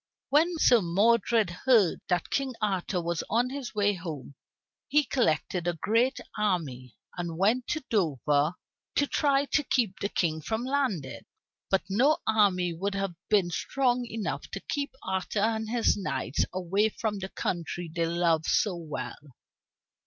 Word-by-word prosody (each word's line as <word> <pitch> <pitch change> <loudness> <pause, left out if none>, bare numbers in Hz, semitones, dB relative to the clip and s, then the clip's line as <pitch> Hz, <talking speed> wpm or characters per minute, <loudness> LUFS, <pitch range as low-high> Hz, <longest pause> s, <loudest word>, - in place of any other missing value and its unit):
When 325 +4 +3
Sir 245 -7 +5
Modred 215 +3 +2
heard 215 -1 +3
that 180 -1 -1
King 270 -2 -1
Arthur 190 -3 -1
was 170 -1 -2
on 240 +3 +1
his 270 -5 -6
way 205 0 +3
home, 160 -7 -7 0.5
he 300 +1 +4
collected 180 - 0
a 175 -1 -1
great 235 - +2 0.2
army 145 - -2 0.2
and 170 -2 -4
went 225 +7 +2
to 310 - -2
Dover 150 - +1 0.4
to 285 - +3
try 280 -1 +2
to 295 - +1
keep 235 -8 0
the 200 - -1
King 160 -5 0
from 220 +9 -2
landing. 255 - -1 0.5
But 195 - +2
no 255 +11 +3
army 190 -5 +3
would 195 +4 -3
have 195 -2 -2 0.2
been 195 -5 +3
strong 250 +6 0
enough 225 -2 -4
to - - -3
keep 285 -1 -3
Arthur 190 +2 -2
and 220 0 0
his 235 0 +2
knights 155 -8 -1
away 190 +4 +1
from 210 -1 -3
the 190 0 -5
country 175 -1 -3
they 165 -1 +1
loved 165 -2 +1
so 200 -4 +2
well. 145 -4 -7
200 Hz, 155 wpm, -28 LUFS, 170-235 Hz, 0.5 s, Sir